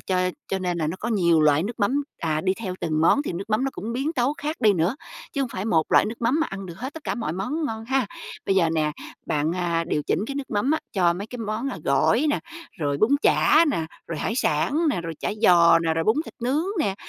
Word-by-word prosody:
cho 185 -1 0 0.2
cho 190 - -1
nên 180 -2 -2
là 155 - 0
nó 165 +4 -3
có 235 - -2
nhiều 170 -7 +3
loại 150 +1 +4
nước 225 +2 -5
mắm, 275 +8 +2 0.2
à, 155 -2 -1
đi 185 +2 +1
theo 190 -5 -5
từng 155 -2 0
món 225 - +4
thì 280 - -4
nước 195 +5 -6
mắm 215 +5 +2
nó 270 - 0
cũng 225 +3 -5
biến 275 +6 -1
tấu 270 0 +1
khác 305 +3 -3
đi 210 -2 +5
nữa, 180 - 0 0.4
chứ 280 - -2
hông 255 - -2
phải 190 -2 -5
một 165 -8 +1
loại - - +6
nước 230 +2 -6
mắm 260 +8 +2
mà 320 - +1
ăn 195 -1 -6
được 170 - -8
hết 260 +5 -6
tất 320 - -10
cả - - -1
mọi 225 -10 -3
món 290 - -2
ngon 220 -2 -5
ha? 265 -2 +1 0.4
Bây 195 - +2
giờ 165 -3 +3
nè, 155 -2 0 0.3
bạn, 150 +2 0
a, 170 -2 -1
điều 150 - 0
chỉnh - - 0
cái 275 - -5
nước 280 - -5
mắm 210 +6 0
á 315 - +2
cho 175 -3 +3
mấy 195 +4 -6
cái 245 +2 -8
món, 225 +4 -3
a, - - -5
gỏi 255 +7 +3
nè, - - 0 0.4
rồi 145 -2 0
bún 215 +5 +3
chả 325 +2 +5
nè, 160 -10 -1 0.2
rồi 165 -3 -4
hải 225 - -2
sản 290 - +1
nè, 175 - -1
rồi 165 -1 -5
chả - - -1
giò 170 -4 +6
nè, 165 -1 0
rồi 165 0 0
bún 220 +4 +3
thịt - - -11
nướng 280 +7 +1 0.2
nè, 195 -9 0
200 Hz, 270 wpm, -24 LUFS, 170-250 Hz, 0.4 s, loại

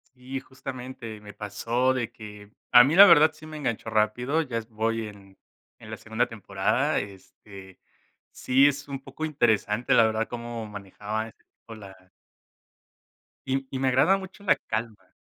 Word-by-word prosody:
Sí, 130 +1 -6
justamente. 125 -4 -8
Me 105 -1 -11
pasó 115 +5 -1
de 120 -2 -3
que 105 -2 -12 0.2
a 120 0 +9
mí 145 +6 +1
la 200 +2 +11
verdad 155 -3 +7
sí 155 0 -14
me 155 0 -8
enganchó 115 -6 -3
rápido. 120 +8 +1
Ya 125 -7 -4
es 110 -1 -5
voy 110 0 -2
en 100 -2 -15 0.4
en - - -12
la - - -4
segunda 115 +2 -2
temporada, 110 +6 -1
este, 95 -1 -12 0.5
sí 135 +2 +3
es 140 0 -2
un 135 -1 -5
poco 135 +3 -9
interesante, 120 -6 +1
la 115 - +6
verdad, 110 0 -1
cómo 120 -2 -6
manejaba 105 +2 -5
ese - - -25
tipo 115 - -13
la 95 -3 -13 1.4
y 135 0 -2
y 130 - -4
me 135 - +1
agrada 150 +10 +4
mucho 195 +1 -11
la - - +4
calma, 110 -2 -6
115 Hz, 165 wpm, -26 LUFS, 105-135 Hz, 1.4 s, la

